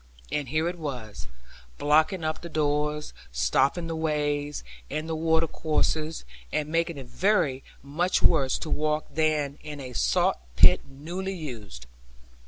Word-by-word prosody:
And 145 -2 -1
here 155 +4 +1
it 175 0 -4
was, 120 - -6 0.5
blocking 160 +5 +3
up 155 0 -2
the 170 - -7
doors, 150 -1 0 0.2
stopping 130 - +2
the 165 0 -3
ways, 150 -2 -1 0.3
and 155 +1 -3
the 165 - -2
water 160 0 +3
courses, 155 - -1 0.3
and 150 0 -1
making 165 0 0
it 135 - -7
very 165 -3 +1 0.2
much 170 +6 +1
worse 140 -6 +4
to 155 - -5
walk 155 0 +1
than 155 -2 +1
in 150 -1 -7
a 130 -2 -7
saw 60 - +3 0.2
pit - - +7
newly 175 +8 -5
used. 110 - -7
150 Hz, 145 wpm, -27 LUFS, 140-160 Hz, 0.5 s, pit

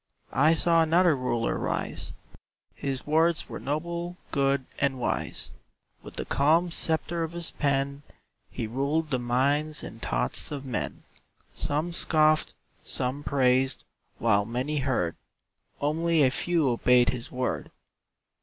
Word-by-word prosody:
I 155 +4 +5
saw 165 +1 +4
another 165 +1 +4
Ruler 120 -3 -1
rise - - -2 0.6
His 135 -2 -4
words 160 +2 +2
were - - -6
noble, 170 +4 -3
good, 140 -2 +1
and 140 -2 +1
wise; 125 - -2 0.5
With - - -11
the - - -4
calm 165 +5 +3
sceptre 165 +1 -1
of 165 +1 -4
his 170 -1 -3
pen 140 -1 0 0.5
He - - -4
ruled 140 +7 -1
the 130 - +1
minds 140 +5 +1
and 115 - -9
thoughts - - -1
of 140 -2 -5
men; 125 -5 -4 0.5
Some 155 +4 -2
scoffed, 155 -2 +2 0.3
some 130 +3 -1
praised 130 -1 +2 0.3
while 105 -3 +3
many 125 +7 -2
heard, 130 -11 0 0.6
Only 160 +2 +2
a 130 - +4
few 165 +2 +1
obeyed 125 +1 +4
his 125 -2 -4
word. 125 0 -2
140 Hz, 130 wpm, -27 LUFS, 130-160 Hz, 0.6 s, I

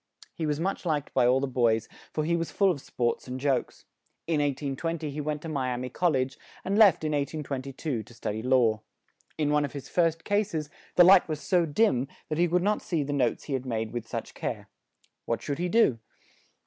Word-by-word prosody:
He 160 - -3
was 150 0 -1
much 190 +4 -2
liked 155 -5 -1
by 125 -2 +4
all 130 +2 +4
the 140 - 0
boys, 115 -4 +1 0.2
for 155 - -1
he 170 +2 +2
was 165 -1 -2
full 195 -2 +3
of 145 -6 -4
sports 120 -2 -2
and 125 +1 -5
jokes. 135 -2 -1 0.4
In 165 -2 +1
1820 145 +3 -2
he 150 +2 -4
went 150 0 -3
to - - -5
Mi 135 -5 -1
a 125 - -2
mi 125 +1 -4
Col 175 +5 +1
lege, 130 0 -1 0.3
and 195 - 0
left 205 -7 +6
in 155 - 0
1822, 140 -2 -3
to 120 +2 -14
stud 105 - -3
y 110 - -4
law. 120 -4 +3 0.6
In 150 -2 +1
one 150 0 +3
of 145 - -4
his 140 -2 -7
first 165 -2 +1
cases, 195 -8 -1 0.2
the 175 - +8
light 185 -1 +7
was 155 -1 -2
so 175 0 +2
dim, 145 - +2 0.2
that 155 +1 -2
he 175 - +4
could 175 +1 +1
not 210 +2 +1
see 165 -5 -1
the 145 +1 -3
notes 125 -5 0
he 145 - -5
had 130 -1 -2
made 110 -2 -2
with 120 -2 -4
such - - -5
care. - - -5 0.6
What 115 - -1
should 145 0 -3
he 180 +1 0
do? 170 - +3
145 Hz, 225 wpm, -28 LUFS, 130-165 Hz, 0.6 s, the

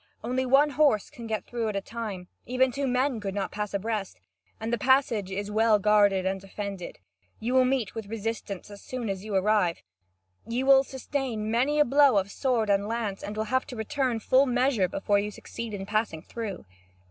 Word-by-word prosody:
Only 255 +3 -1
one 280 +3 +5
horse 285 -7 +2
can 240 -6 -9
go 220 -1 -1
through 235 -2 -3
at 210 - -4
a - - +1
time; 200 -4 -6 0.2
even 255 +1 +2
two 275 +1 -2
men 255 -1 +1
could 195 -2 -4
not 200 -1 -2
pass 210 0 -3
abreast, 200 - -3 0.4
and 225 +1 -3
the - - +2
passage 250 -6 +2
is 200 +2 -4
well 220 0 +4
guarded 205 -2 +3
and 190 0 -1
defended. 195 -1 -6 0.4
You 235 +3 -2
will 260 0 +5
meet 255 -6 0
with 225 -3 -6
resistance 215 -2 -5
as 200 - -11
soon 250 -4 -5
as 190 0 -5
you 210 -2 -4
arrive. 190 -3 +2 0.6
You 245 +3 -1
will 270 0 +7
sustain 260 -5 -3
many 260 +6 +2
a 295 - +5
blow 280 -3 +5
of 195 0 0
sword 245 -4 0
and 200 0 +2
lance, 220 -3 -3
and 205 +1 -6
will 215 - 0
have 260 - +2
to 250 - -7
return 245 +1 -1
full 260 +5 +4
measure 245 -5 +2
before 200 +3 +1
you 205 +1 -2
succeed 230 +2 -7
in 195 -2 -5
passing 210 -6 -1
through." 225 - -6
220 Hz, 200 wpm, -27 LUFS, 200-255 Hz, 0.6 s, will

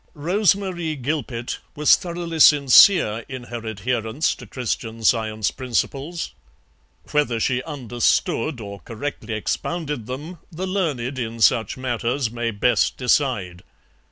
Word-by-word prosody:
Rose 180 +6 +2
Marie 175 -5 -4
Gilpet 130 -3 -3 0.2
was 150 0 +6
thoroughly 170 -2 -5
sincere 140 - +6
in 130 -2 -6
her 120 -1 -7
adherence 115 - -1
to - - -12
Christian 115 -2 -4
Science 110 -2 +1
principles; 135 +6 -3 0.8
whether 145 -6 +1
she 125 +2 +1
understood 125 0 0
or 100 -2 -8
correctly 115 -2 -5
expounded 150 +2 -3
them 150 +7 -7
the 175 +3 -4
learned 145 -10 -2
in 115 -1 -4
such 115 +3 +3
matters 125 0 -1
may 120 0 -2
best 115 +3 +1
decide. 120 -9 0
125 Hz, 120 wpm, -22 LUFS, 115-155 Hz, 0.8 s, was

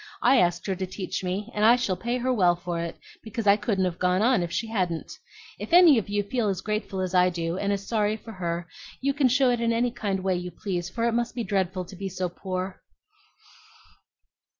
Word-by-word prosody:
I 270 - +6
asked 175 -1 +1
her 195 - -1
to 190 0 -3
teach 185 0 -4
me, 195 +5 -3
and 210 - -1
I 230 +3 +7
shall 245 -7 -1
pay 235 +5 -2
her 255 +1 0
well 180 -6 +4
for 175 0 -4
it, 170 0 -4 0.3
because 225 0 -5
I 200 0 +7
couldn't 205 -3 0
have 180 -2 -3
gone 180 +2 +2
on 245 -4 +4
if 170 -1 -3
she 225 - -1
hadn't. 185 -7 -2 0.5
If - - -6
any 340 -8 +8
of 205 - -7
you 205 0 0
feel 220 +1 -1
as 190 -2 -2
grateful 210 -3 -3
as 185 0 -3
I 180 0 +5
do, 170 -1 -3
and 200 0 0
as 200 0 -2
sorry 215 -1 +1
for 225 - -11
her, 170 -3 -3 0.3
you 275 +1 0
can 280 -2 +3
show 255 0 +3
it 240 -1 0
in 230 0 +2
any 235 +1 +1
kind 195 -5 -3
way 190 -1 +1
you 180 0 -5
please, 180 0 -4
for 230 +4 -3
it 235 - +2
must 235 0 -1
be 240 - -2
dreadful 190 -2 -1
to 190 - -11
be 195 +1 -5
so 185 -1 -3
poor." 185 +1 -5
195 Hz, 235 wpm, -26 LUFS, 180-230 Hz, 0.5 s, any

